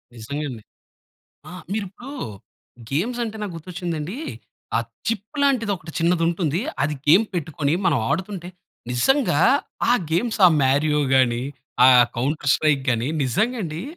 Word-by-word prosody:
నిజంగా 140 +7 -5
అండి. 115 -4 -8 0.9
ఆహ్, 180 -1 -9
మీరు 210 -1 -1
ఇప్పుడు 245 +9 -11 0.8
గేమ్స్ 235 - -1
అంటే, 220 -1 -6
నాకు 205 -3 -4
గుర్తు 165 +3 -11
వచ్చింది 175 -2 -3
అండి. 185 - -5 0.6
ఆ - - +3 0.3
చిప్ 225 +6 -4
లాంటిది 250 -7 +2
ఒకటి 160 -1 -11
చిన్నది 165 0 +2
ఉంటుంది. 170 0 -1 0.2
అది 150 +1 0
గేమ్ 185 +9 +6
పెట్టుకొని, 155 -2 -1
మనం 145 -7 +3
ఆడుతుంటే, 180 +2 -3 0.4
నిజంగా 235 - +2 0.5
ఆ - - +6 0.2
గేమ్స్ 225 +7 0
ఆ - - +8
మారియోగాని, 135 -3 +2 0.4
ఆ - - +9 0.3
కౌంటర్ 145 +2 0
స్ట్రైక్ 145 -3 +2
గాని 120 +2 0 0.2
నిజంగా 225 - 0
అండి. 160 0 -5
165 Hz, 140 wpm, -22 LUFS, 145-205 Hz, 0.9 s, ఆ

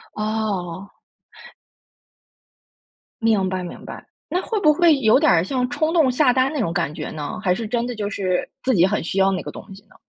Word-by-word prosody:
哦。 200 -4 -3 2.3
明 215 -4 +2
白 185 0 -2
明 175 - -9
白， - - -9 0.3
那 360 - 0
会 435 +1 -2
不 305 -4 +5
会 330 -1 +4
有 225 -1 +4
点 175 - +3
像 250 +2 -1
冲 310 +3 -1
动 310 -7 +4
下 255 0 +3
单 260 +2 +2
那 305 - -3
种 170 -8 -1
感 170 -4 -1
觉 - - -6
呢？ 150 +3 -5
还 180 -3 +3
是 220 +3 -4
真 235 +2 -1
的 245 - -4
就 205 -2 -3
是 185 -3 -2
自 260 - +2
己 175 -5 +5
很 210 +2 -1
需 185 +4 -2
要 195 0 +4
那 185 - -3
个 - - -6
东 - - -10
西 200 - -16
呢？ - - -23
215 Hz, 220 characters per minute, -21 LUFS, 185-260 Hz, 2.3 s, 不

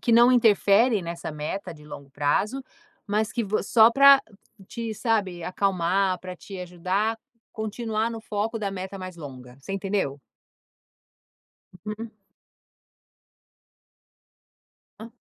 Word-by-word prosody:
que 235 - +1
não 240 +2 +7
interferem 220 -2 +4
nessa 170 -2 -6
meta 155 +4 -5
de 150 -1 -16
longo 140 -2 -10
prazo, 200 - 0 0.4
mas 215 +1 -1
que 240 - -1
vo 210 0 -1
só 225 +1 +6
para 275 +2 +7 0.5
te 230 -2 -5
sabe, 200 -7 -1
acalmar, 185 0 0
para 185 0 -8
te 195 +2 -10
ajudar 185 +5 -1
a 225 - -22 0.3
continuar 220 +1 -2
no 225 - -6
foco 215 +1 -3
da 200 -1 -2
meta 190 +1 -6
mais 185 -2 -8
longa. 130 -5 -10
Você 195 - -7
entendeu? 195 -8 -2 1.7
Uhum. 215 +1 -6 2.9
Hã. 225 +1 -10
200 Hz, 120 wpm, -25 LUFS, 180-225 Hz, 2.9 s, não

